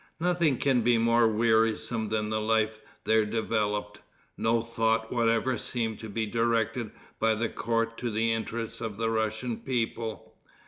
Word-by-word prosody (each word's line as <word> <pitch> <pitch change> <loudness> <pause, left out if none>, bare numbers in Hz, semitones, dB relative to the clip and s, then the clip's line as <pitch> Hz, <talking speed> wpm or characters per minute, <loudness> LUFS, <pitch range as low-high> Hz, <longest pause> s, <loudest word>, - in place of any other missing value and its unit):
Nothing 170 -5 +2
can 130 -3 +2
be 120 +1 +3
more 115 0 +4
wearisome 110 0 +1
than 105 0 -1
the 110 0 0
life 110 0 +1 0.2
there 110 0 +3
developed. 105 -1 -1 0.4
No 115 0 +1
thought 115 0 0
whatever 120 +1 +1
seemed 115 -3 -3
to 110 - -7
be 110 +2 -1
directed 115 0 0 0.3
by 110 0 +3
the 115 +1 -1
court 115 0 -1
to 120 - -2
the 115 +1 +1
interests 115 +1 -4
of 110 -3 -4
the 115 0 0
Russian 110 +2 -1
people. 115 -3 -3
115 Hz, 150 wpm, -28 LUFS, 110-115 Hz, 0.4 s, more